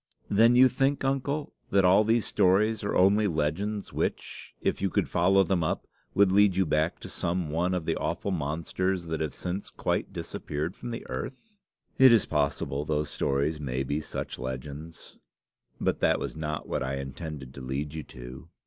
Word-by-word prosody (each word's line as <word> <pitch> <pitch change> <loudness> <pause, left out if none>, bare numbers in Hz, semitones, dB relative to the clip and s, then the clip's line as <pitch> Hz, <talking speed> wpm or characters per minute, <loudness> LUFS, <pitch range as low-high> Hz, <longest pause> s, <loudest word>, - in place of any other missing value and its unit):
"Then 115 +4 +5
you 130 +1 +8
think, 135 +2 0
uncle, 140 +2 -1 0.2
that 100 -1 +4
all 95 +4 +6
these 115 0 +2
stories 105 +4 +2
are 100 - -1
only 100 +3 +4
legends 95 +6 -2
which, - - -3
if - - -1
you 100 - +1
could - - 0
follow 95 +3 +4
them 90 -2 0
up, 80 - -1 0.3
would 100 -1 +5
lead 100 -1 +5
you 95 0 +3
back 80 +2 0
to - - -7
some 85 -2 -2
one 90 +4 +1
of 90 -3 -3
the - - 0
awful 100 - -2
monsters 85 +3 -1
that 80 -1 -3
have 80 -2 -1
since 90 +2 -4
quite - - -2
disappeared 75 +6 -4
from 120 - -7
the 115 - -6
earth." 135 - -7 0.4
"It 130 -1 +9
is 115 -3 +5
possible 70 -2 -1
those 75 -1 -1
stories 70 +3 0
may 65 -2 -2
be 70 +3 -2
such 80 - -5
legends; 70 +5 -7 0.6
but - - 0
that - - +3
was - - -4
not 75 -1 -4
what - - -2
I 65 0 -2
intended 70 0 -6
to 70 - -9
lead 70 +3 -3
you 80 - -4
to. 65 -2 -11
85 Hz, 185 wpm, -28 LUFS, 75-100 Hz, 0.6 s, It